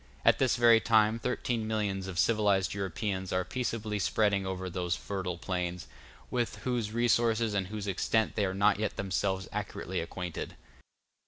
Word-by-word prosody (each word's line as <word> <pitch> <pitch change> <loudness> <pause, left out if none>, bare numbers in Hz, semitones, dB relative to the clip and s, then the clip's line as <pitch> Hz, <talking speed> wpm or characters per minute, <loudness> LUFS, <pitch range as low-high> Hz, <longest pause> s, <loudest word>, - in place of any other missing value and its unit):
At - - +5
this 130 -3 +3
very 120 -2 +6
time 110 0 +3
thirteen 120 -2 -1
millions 100 -3 -1
of 95 -2 -6
civilized 100 +1 +2
Europeans 95 0 -3
are 90 0 0
peaceably 115 -4 -2
spreading 100 0 +1
over 95 0 -3
those 90 -1 -1
fertile 95 -3 -4
plains, 90 0 -3 0.5
with 120 -2 -1
whose 120 -4 -1
resources 115 -1 +2
and 95 -2 0
whose 105 0 -5
extent 105 +3 +1
they 105 - +2
are 95 0 -2
not 100 +1 +3
yet 105 -1 -1
themselves 95 0 -1
accurately - - -3
acquainted. 90 -2 -5
100 Hz, 155 wpm, -30 LUFS, 95-110 Hz, 0.5 s, very